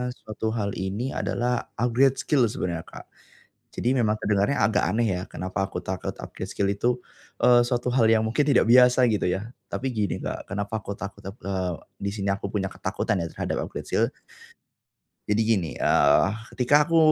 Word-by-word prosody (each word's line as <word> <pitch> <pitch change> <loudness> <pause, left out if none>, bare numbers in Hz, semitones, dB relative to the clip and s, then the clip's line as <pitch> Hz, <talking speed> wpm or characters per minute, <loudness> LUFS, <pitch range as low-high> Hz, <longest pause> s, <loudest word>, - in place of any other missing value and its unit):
suatu 110 0 -4
hal 100 -3 -1
ini 100 +7 -3
adalah 125 0 -1
upgrade 125 +3 +3
skill 140 -6 +3
sebenarnya 85 -5 -3
Kak. - - -11 0.7
Jadi 120 - 0
memang 110 -2 +2
kedengarannya 100 +5 +1
agak 105 -2 +3
aneh 115 +4 +1
ya - - -5
kenapa 95 +1 -3
aku - - -5
takut 95 0 -4
upgrade - - -7
skill 100 -1 0
itu, 100 +4 0 0.5
eee 120 0 +7
suatu 120 0 -1
hal 120 -2 +3
yang 110 -1 +4
mungkin 115 +7 +1
tidak 145 - +4
biasa 125 +1 +7
gitu 105 - 0
ya. 95 +5 -2 0.2
Tapi 135 - -2
gini 105 -5 -1
Kak, - - -4
kenapa 100 +3 -3
aku 100 - -6
takut 100 0 -8
aku 95 +5 -8
eee 95 -2 -1 0.3
di 100 - 0
sini 100 -2 -3
aku 100 0 -3
punya 95 -2 -1
ketakutan 95 - -2
ya 85 - -2
terhadap - - -2
upgrade - - -7
skill. - - +2 1.2
Jadi 105 +1 +2
gini, 95 -8 +1
eee 70 +5 +4 0.2
ketika 145 +4 +4
aku, 165 +1 +2
110 Hz, 180 wpm, -25 LUFS, 100-120 Hz, 1.2 s, eee